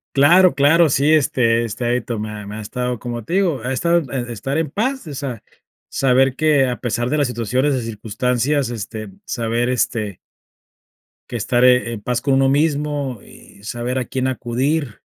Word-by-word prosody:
Claro, 170 +3 +6
claro. 155 +4 +5
Sí, 140 +3 +2
este 120 -6 +2
este, 115 +1 -4
ahí 120 +1 +1
to 115 0 -4
me 110 +1 -4
ha 105 -1 -7
me 105 - -7
ha 110 - -6
estado, 125 +3 -3
como 120 -2 -5
te 170 - -6
digo, 175 - +1
ha 125 - -2
estado 170 +6 +2 0.3
estar 125 +6 -3
en 155 -3 -1
paz, 260 +2 -2
o 150 - -6
sea, 135 -4 -5 0.5
saber 130 0 +2
que, 150 -3 +3
a 125 -1 -3
pesar 120 0 -1
de 150 - 0
las 145 -2 +2
situaciones 125 +4 0
y 125 - -2
circunstancias, 125 +5 -1
este, 110 -1 -6 0.2
saber, 120 +1 -1
este 110 -5 -1 1.1
que - - -6
estaré 125 +1 +3
en 115 -3 -6
paz 120 +2 -1
con 135 -2 +2
uno 135 0 +3
mismo, 145 -3 0
y 100 - -17
saber 120 +3 -3
a 125 - -3
quién 130 -1 -2
acudir 130 +1 -2
125 Hz, 180 wpm, -20 LUFS, 115-145 Hz, 1.1 s, Claro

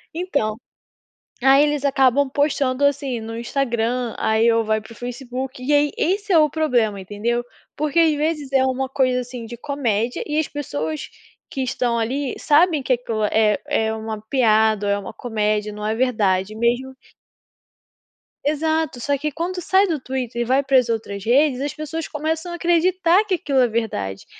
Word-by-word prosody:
Então, 285 -12 -1 0.9
aí 270 +2 +6
eles 295 -1 0
acabam 270 0 +3
postando, 280 -1 0
assim, 280 -3 +1
no 225 +1 -6
Instagram 240 -1 -1
aí 220 +2 +3
ou 230 0 +2
vai 215 0 0
para 220 - -15
o - - -11
Facebook, 255 +2 -6
e 290 +3 +1
aí 290 0 +3
esse 400 +3 0
é - - +7
o 305 -1 +5
problema, 245 -10 +1
entendeu? 215 +5 -2 0.3
Porque 305 +1 -2
às 320 -2 +5
vezes 300 -2 -2
é 265 -1 +3
uma 265 0 -1
coisa, 255 -2 +1
assim, 245 -1 -8
de 235 +1 -8
comédia 245 -4 -1
e 300 0 -1
as 315 - +1
pessoas 155 - -4 0.4
que 270 - -4
estão 245 -2 -1
ali 255 +4 -2
sabem 305 -1 +3
que - - -3
aquilo 230 -3 -2
é 210 0 +2
é 220 0 +1
uma 220 -1 -5
piada, 220 -4 +3
é 200 - +2
uma 200 - -7
comédia, 215 -2 -1
não 210 0 -6
é 215 +1 0
verdade. 215 -5 +1
Mesmo 240 +3 0 1.5
Exato, 310 -2 0
só 280 +4 0
que 300 +2 -3
quando 355 +4 -3
sai 380 +3 +3
do 315 -5 -2
Twitter 255 -2 -3
e - - 0
vai 260 +3 +3
para 270 -1 +3
as 245 -2 +2
outras 205 -3 -3
redes 265 +3 +3
as 285 0 -2
pessoas 310 +2 -5
começam 320 +3 -3
a 345 - -4
acreditar 345 +2 +3
que 405 -3 0
aquilo 285 -7 0
é 250 - +5
verdade. 100 - -3
255 Hz, 175 wpm, -21 LUFS, 225-295 Hz, 1.5 s, é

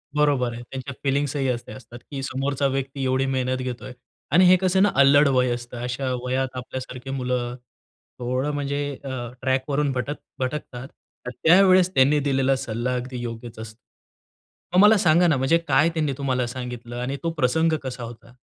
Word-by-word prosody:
बरोबर 140 -5 +2
आहे. 120 +1 -8
त्यांच्या 135 +1 -6
फिलिंग्सही 140 0 0
असे 120 -1 -4
असतात, 120 -1 -12
की 135 -2 -4
समोरचा 135 +1 -1
व्यक्ती 135 0 -3
एवढी 130 +1 +1
मेहनत 130 -1 -1
घेतोय 125 0 -6 0.4
आणि 180 +3 +6
हे 180 +1 +7
कसं 190 0 +2
ना 205 - +3
अल्लड 140 +1 +6
वय 130 -2 +2
असतं, 120 0 -7
अशा 125 +2 -2
वयात 130 0 -2
आपल्यासारखी 125 0 -7
मुलं, 125 -2 -2 0.6
थोडं 130 +4 -1
म्हणजे 145 0 -2 0.2
अ, 130 -3 -5
ट्रॅक 130 +1 0
वरून 145 0 +1
भटक 135 +3 -3 0.2
भटकतात. 130 -1 -4 0.4
त - - -1
त्यावेळेस 185 +1 +5
त्यांनी 140 +1 +4
दिलेला 135 -1 +1
सल्ला 125 -1 -3
अगदी 125 0 -5
योग्यच 115 -1 -7
असतो. 110 0 -9 0.9
मग 180 - +5
मला 210 +1 +7
सांगा 175 -1 +4
ना, 155 -5 +3
म्हणजे 135 +6 +3
काय 145 +3 +4
त्यांनी 155 -4 0
तुम्हाला 130 -3 -1
सांगितलं 125 -1 -7
आणि 135 +3 -3
तो 165 - 0
प्रसंग 160 +3 +1
कसा 125 -2 -5
होता? 115 0 -11
130 Hz, 170 wpm, -24 LUFS, 125-145 Hz, 0.9 s, हे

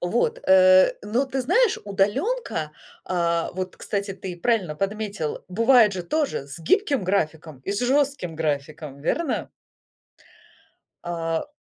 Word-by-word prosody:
Вот, 180 +7 0
э, 185 0 +7
но 230 +6 0
ты 265 0 -3
знаешь, 375 - +2
удаленка, 205 - -1 0.3
а, 170 -2 0
вот 185 0 -5
кстати, 200 -1 -3
ты 185 -2 -7
правильно 185 -5 0
подметил, 200 -3 -3
бывает 230 +2 +5
же 180 -1 -4
тоже 275 - -1
с 145 +4 -9
гибким 280 - +1
графиком, 160 -6 -2
и 200 - -2
с 200 - -2
жестким 265 - 0
графиком. 150 -2 -3
Верно? 305 - -1 1.6
А. 165 - -2
190 Hz, 125 wpm, -24 LUFS, 165-240 Hz, 1.6 s, э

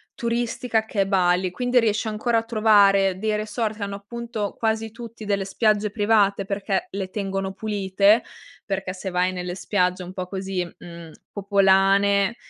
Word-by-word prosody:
turistica 235 -1 -1
che 215 -2 -1
è - - +2
Bali, 185 -1 +2
quindi 245 +4 +1
riesci 220 -1 0
ancora 225 +2 0
a - - -5
trovare 200 -4 +4
dei 215 +1 0
resort 215 +1 -2
che 210 - -5
hanno 200 0 -4
appunto, 225 0 -5
quasi 225 0 -1
tutti, 230 -1 -10
delle 200 -1 -1
spiagge 210 +1 +1
private 205 -2 +2
perché 200 0 -2
le 190 -1 -5
tengono 195 -1 -3
pulite. 205 +1 +2 0.4
Perché 195 -2 -3
se 190 0 -5
vai 180 +1 +1
nelle 180 -1 -5
spiagge 180 -1 0
un 180 0 -8
po' 185 -1 -4
così, 190 -1 -3
mhmm, 170 -1 -12 0.2
popolane, 200 +1 +3
200 Hz, 160 wpm, -23 LUFS, 190-220 Hz, 0.4 s, trovare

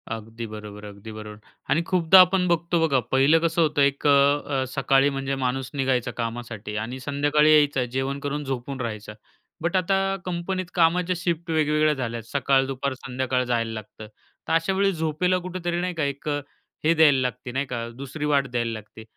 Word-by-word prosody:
अगदी 115 +1 -6
बरोबर, 105 -1 -9
अगदी 105 +1 -10
बरोबर 105 -1 -9 0.3
आणि 165 - +3
खूपदा 185 0 +6
आपण 185 0 +5
बघतो 170 0 +1
बघा, 135 -4 +2
पहिलं 135 +5 +5
कसं 165 +1 +1
होतं 155 -2 +2
एक 140 +1 +2
अ, - - +5 0.5
अ, - - +1
सकाळी 135 +1 +2
म्हणजे 135 0 -2
माणूस 130 +1 -1
निघायचा 130 -3 0
कामासाठी 115 -3 -5
आणि 115 +5 -4
संध्याकाळी 145 +3 +2
यायचा, 145 -3 +4
जेवण 135 +3 -3
करून 145 +1 -3
झोपून 135 0 -4
राहायचा. 110 -3 -5 0.5
बट 170 +3 -1
आता 195 +1 +1
कंपनीत 185 +1 -3
कामाच्या 180 +1 +2
शिफ्ट 170 -1 -2
वेगवेगळ्या 155 -1 +2
झाल्या. 120 -4 -4
सकाळ, 135 +2 +2
दुपार, 135 0 -3
संध्याकाळ 130 0 -2
जायला 115 -2 -1
लागतं, 110 0 -9 0.4
तर - - 0
अशा 165 +4 +2
वेळी 195 +1 +2
झोपेला 160 +2 0
कुठेतरी 175 -1 -3
नाही 180 0 -2
का, 160 -3 -2
एक 140 +1 -4 0.6
हे 160 +2 +4
द्यायला 155 -4 +5
लागते 125 0 -3
नाही 135 +3 -1
का, 120 -3 -4
दुसरी 140 +3 -5
वाट 140 -2 +2
द्यायला 120 -1 -1
लागते. 110 0 -10
140 Hz, 175 wpm, -24 LUFS, 125-165 Hz, 0.6 s, खूपदा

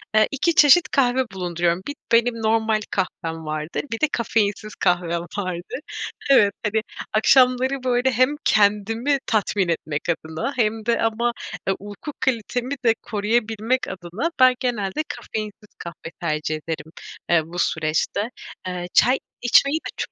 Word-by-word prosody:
eee, 215 0 +5
2 315 +4 +1
çeşit 310 +2 +7
kahve 260 -1 +2
bulunduruyorum. 175 -1 -1
Bir 285 - -4 0.2
benim 235 +1 +4
normal 220 -1 +2
kahvem 165 -4 -3
vardır, 155 +1 -3
bir 225 - -3
de 310 - +4
kafeinsiz 215 -2 0
kahvem 175 -1 +1 0.2
vardır. 185 +2 -4 0.5
Evet, 205 -7 +6
tabii, 215 0 0 0.3
akşamları, 255 +3 +4
böyle, 250 +1 +2
hem 255 +4 +2
kendimi 215 +6 +2
tatmin 205 -3 +1
etmek 155 -2 -2
adına 160 - -2
hem 220 -2 0
de 235 0 +1
ama 225 +2 +1 0.5
uyku 205 +9 -8
kalitemi 250 +2 -1
de 230 - +6
koruyabilmek 225 +3 0
adına 190 - -4
ben 255 -1 +7
genelde 240 0 -1
kafeinsiz 215 -1 -6
kahve 170 -1 -8
tercih 155 -2 -1
ederim, 155 0 -6 0.4
eee, 170 -2 +5
bu 175 +2 -7
süreçte. 160 +8 0 0.4
Eee, 180 -1 -4
çay 255 +2 +5 0.2
içmeyi 275 +5 +4
de - - -7
çok - - -4
215 Hz, 135 wpm, -22 LUFS, 175-245 Hz, 0.5 s, çeşit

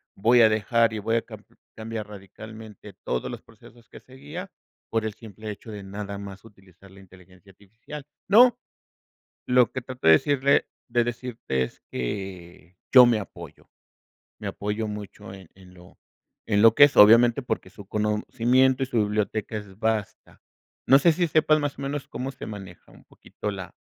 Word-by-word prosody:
voy 120 +4 +4
a 110 - +7
dejar 115 +1 +2
y 110 - -5
voy 115 +2 0
a - - 0
cam - - -13 0.3
cambiar 110 -1 -6
radicalmente 105 +1 -12
todos 65 - -3
los - - -8
procesos 120 -1 -19
que - - -13
seguía 145 +9 -10 0.4
por 115 -1 -1
el 110 - -3
simple 110 -1 -9
hecho 105 +2 -11
de 105 -2 -8
nada 100 +1 -7
más 100 -1 -10
utilizar 95 -3 -19
la 95 +1 -17
inteligencia 95 0 -19
artificial". 110 +10 -12 0.2
No, 240 +4 +6 0.9
lo 125 -2 +3
que 130 - -5
trato 130 -5 -7
de 80 - +9
decirle 140 - +2 0.2
de 120 0 +1
decirte 120 - -3
es - - -11
que, 90 +5 -7
yo 125 -2 +9
me 120 -2 +3
apoyo, 85 -6 -11 0.7
me - - -6
apoyo 105 +2 -3
mucho 105 -1 -9
en 95 -4 -13
en 95 -1 -17
lo 90 0 -18 0.5
en 105 -2 +2
lo 115 0 +7
que 145 - +8
es, 145 - -2
obviamente 115 +4 +7
porque 120 -6 -4
su 100 +1 -13
conocimiento 120 +5 +1
y - - +1
su 125 -3 -1
biblioteca 105 +1 -2
es 100 -2 -11
basta. 110 -2 -3 0.5
No 135 - +7
sé 165 +4 +4
si 175 +2 0
sepas, 155 0 +3
más 145 -1 -3
o - - -9
menos, 140 0 -4
cómo 130 +3 -5
se - - -10
maneja 95 -5 -11
un - - -19
poquito 105 - -8
la 95 -2 -9
110 Hz, 175 wpm, -25 LUFS, 100-125 Hz, 0.9 s, de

